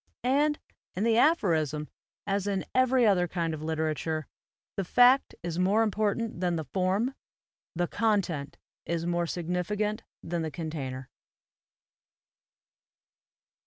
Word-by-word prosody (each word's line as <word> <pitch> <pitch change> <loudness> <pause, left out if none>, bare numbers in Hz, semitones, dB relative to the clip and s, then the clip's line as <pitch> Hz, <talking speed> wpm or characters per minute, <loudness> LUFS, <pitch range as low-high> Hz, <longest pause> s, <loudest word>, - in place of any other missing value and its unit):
And 290 +4 +2 0.4
in 190 - -1
the 230 0 +4
aphorism, 160 - +2 0.4
as 200 0 -1
in 195 -2 -1
every 255 -1 +4
other 185 -4 +3
kind 165 -1 -2
of 155 - -5
literature, 155 0 -2 0.5
the 195 - -1
fact 245 +8 +5
is 170 0 -3
more 200 +5 +3
important 215 -1 -1
than 175 -1 +1
the 160 - -2
form, 190 - 0 0.6
the 175 +1 +1
content 180 -11 0 0.3
is 170 0 -1
more 175 0 0
significant 180 +6 -2 0.2
than 170 0 -2
the 160 - -2
container. 140 -6 -5
180 Hz, 120 wpm, -28 LUFS, 160-215 Hz, 0.6 s, fact